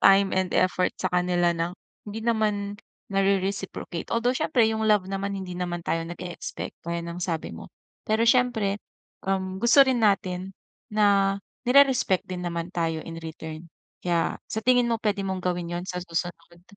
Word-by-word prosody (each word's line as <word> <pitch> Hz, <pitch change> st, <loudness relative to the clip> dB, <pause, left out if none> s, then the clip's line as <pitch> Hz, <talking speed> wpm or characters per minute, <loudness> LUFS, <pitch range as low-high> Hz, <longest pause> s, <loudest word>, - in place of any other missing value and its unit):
time 195 Hz, 0 st, +6 dB
and 185 Hz, -1 st, +1 dB
effort 185 Hz, 0 st, +2 dB
sa -, -, 0 dB
kanila 180 Hz, -1 st, +2 dB
ng 170 Hz, +2 st, -1 dB, 0.4 s
hindi 220 Hz, +2 st, -5 dB
naman 210 Hz, -3 st, 0 dB, 0.4 s
nare-reciprocate. 195 Hz, -2 st, -1 dB
Although 235 Hz, +2 st, +2 dB
siyempre 310 Hz, -6 st, +2 dB
yung 220 Hz, 0 st, -1 dB
love 210 Hz, -3 st, +4 dB
naman 195 Hz, +1 st, -2 dB
hindi 185 Hz, -2 st, -6 dB
naman 175 Hz, -1 st, -2 dB
tayo 165 Hz, -, 0 dB
nag-e-expect, 175 Hz, +1 st, -6 dB
gaya 170 Hz, 0 st, -1 dB
ng 170 Hz, +1 st, -6 dB
sabi 165 Hz, -3 st, -2 dB
mo. -, -, -9 dB, 0.4 s
Pero 220 Hz, +1 st, +2 dB
siyempre, 230 Hz, -5 st, +3 dB, 0.5 s
um, 190 Hz, -1 st, -1 dB
gusto 240 Hz, +4 st, +7 dB
rin 260 Hz, -2 st, +1 dB
natin 190 Hz, -2 st, +1 dB, 0.4 s
na 200 Hz, -2 st, +4 dB, 0.3 s
nire-respect 265 Hz, -8 st, +5 dB
din 180 Hz, -1 st, -4 dB
naman 170 Hz, 0 st, -3 dB
tayo 165 Hz, -2 st, 0 dB
in 165 Hz, 0 st, -7 dB
return. 160 Hz, 0 st, -7 dB, 0.4 s
Kaya 170 Hz, -2 st, 0 dB
sa 220 Hz, -, -1 dB
tingin 245 Hz, -1 st, +5 dB
mo, 230 Hz, -, +1 dB
pwede 205 Hz, -2 st, 0 dB
mong 190 Hz, -1 st, -3 dB
gawin 175 Hz, -1 st, -1 dB
'yon 175 Hz, -, -3 dB
sa 180 Hz, -1 st, -3 dB
susunod? 170 Hz, 0 st, -5 dB
190 Hz, 160 wpm, -26 LUFS, 175-215 Hz, 0.5 s, gusto